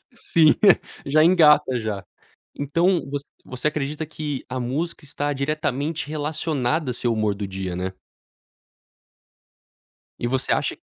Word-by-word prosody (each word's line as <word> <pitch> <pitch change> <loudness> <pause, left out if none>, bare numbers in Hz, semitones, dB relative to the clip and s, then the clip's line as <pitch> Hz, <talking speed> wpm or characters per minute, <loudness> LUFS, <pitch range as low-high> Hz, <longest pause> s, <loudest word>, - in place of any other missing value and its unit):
Sim, 165 -9 +4 0.5
já 155 +3 +4
engata 150 -7 +5
já. 105 -4 -4 0.5
Então 170 +6 +2
vo 145 - -1 0.3
você 130 +3 -2
acredita 150 +1 -2
que 150 -3 -5
a 130 0 -3
música 150 +7 -3
está 145 +1 -3
diretamente 150 +2 -2
relacionada 150 -2 -1
a - - -3
seu 120 0 0
humor 110 -2 0
do 100 0 -4
dia, 95 -2 -4
né? 95 +1 -3 2.3
E - - -2
você 130 0 0
acha - - -1
145 Hz, 125 wpm, -23 LUFS, 125-155 Hz, 2.3 s, engata